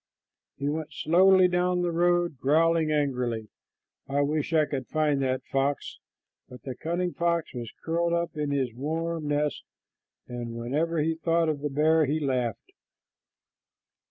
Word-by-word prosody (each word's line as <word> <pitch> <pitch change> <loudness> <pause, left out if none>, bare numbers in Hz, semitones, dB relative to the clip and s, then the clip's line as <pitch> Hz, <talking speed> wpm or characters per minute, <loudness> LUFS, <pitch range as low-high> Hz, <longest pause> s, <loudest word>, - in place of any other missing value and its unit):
He 140 - -3
went 155 +1 -3
slowly 185 +2 +5
down 180 0 +1
the 175 - 0
road, 175 -3 +1
growling 160 +3 +3
angrily, 125 -7 -1 0.6
"I 140 +1 +1
wish 150 +2 -1
I 155 -2 +4
could 135 -4 -4
find 150 -3 +1
that 130 -1 -1
fox;" 135 +1 -2 0.5
but 125 -3 -12
the 130 - -5
cunning 175 +6 -2
fox 170 -1 -1
was 120 -3 -6
curled 170 +1 0
up 170 -1 -1
in 150 -1 -2
his 135 -4 -1
warm 160 +4 -3
nest, 145 0 -1 0.6
and 120 -1 -6
whenever 150 +8 -1
he 160 +1 +1
thought 165 0 +1
of 150 -2 -1
the 150 - -1
bear 155 +3 +3
he 150 +3 0
laughed. 125 -6 -2
155 Hz, 150 wpm, -27 LUFS, 135-165 Hz, 0.6 s, slowly